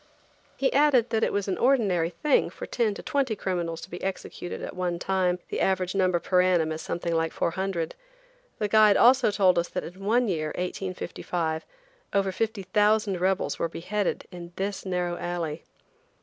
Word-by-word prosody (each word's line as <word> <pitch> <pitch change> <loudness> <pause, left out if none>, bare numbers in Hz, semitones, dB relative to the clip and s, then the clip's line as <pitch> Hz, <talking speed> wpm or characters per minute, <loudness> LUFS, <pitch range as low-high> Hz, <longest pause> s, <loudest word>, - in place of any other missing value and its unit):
He 270 - +1
added 275 -5 +4
that 225 0 +1
it - - +2
was 200 -1 -1
an 190 - -2
ordinary 205 -11 +3
thing 270 - +1
for - - -8
ten 225 -4 0
to - - -8
twenty 270 -6 0
criminals 170 -4 -3
to - - -9
be 175 - -6
executed 190 -2 -5
at - - -6
one 180 -1 -1
time. 180 0 +1
The - - -2
average 185 -1 +1
number 185 -2 +2
per 180 +1 +2
annum 175 -4 +2
is 155 0 -4
something 170 +1 -3
like 165 0 +1
400. 175 -1 -2 0.6
The 210 - 0
guide 215 -1 +6
also 255 0 +6
told 190 -4 +3
us 170 - -2
that - - -3
in 185 +3 -10
one 235 +4 +2
year, 160 -5 -1
1855, 180 -3 -3 0.5
over 195 -1 +2
50,000 210 -1 +1
rebels 190 +1 0
were 165 - 0
beheaded 195 +4 -2
in 175 -1 -9
this 195 0 -3
narrow 180 -1 -1
alley. 170 -3 -3
185 Hz, 175 wpm, -26 LUFS, 175-210 Hz, 0.6 s, guide